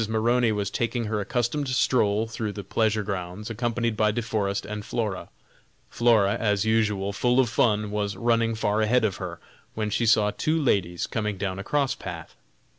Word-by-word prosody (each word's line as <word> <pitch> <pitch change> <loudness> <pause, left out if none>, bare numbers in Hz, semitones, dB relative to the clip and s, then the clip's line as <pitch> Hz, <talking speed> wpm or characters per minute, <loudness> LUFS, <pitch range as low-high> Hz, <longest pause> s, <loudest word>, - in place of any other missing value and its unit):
Maroney 115 +2 +2
was 100 -2 -2
taking 120 0 -1
her 105 -1 -1
accustomed 120 +7 -1
stroll 110 -4 +2
through 110 -2 -4
the 100 - -6
pleasure 110 +2 0
grounds, 100 +2 -5
accompanied 115 0 -1
by 105 0 +2
De 115 +3 -1
Forest 100 -3 -1
and 105 0 -5
Flora. 105 -4 -3 0.6
Flora, 110 -4 +3
as 105 -2 +1
usual, 105 -3 +1
full 125 +6 +2
of 125 -3 +3
fun, 105 -2 +1
was 105 -1 -2
running 115 -1 +1
far 105 0 0
ahead 110 +2 +3
of 100 -2 -1
her, 90 -3 -6 0.4
when 110 -1 -2
she 115 +2 +1
saw 105 -1 +4
two 160 +8 0
ladies 90 - 0
coming 105 -3 -3
down 95 -1 -3
a - - -4
cross 140 +3 +1
path. 85 -3 -8
110 Hz, 180 wpm, -25 LUFS, 100-115 Hz, 0.6 s, saw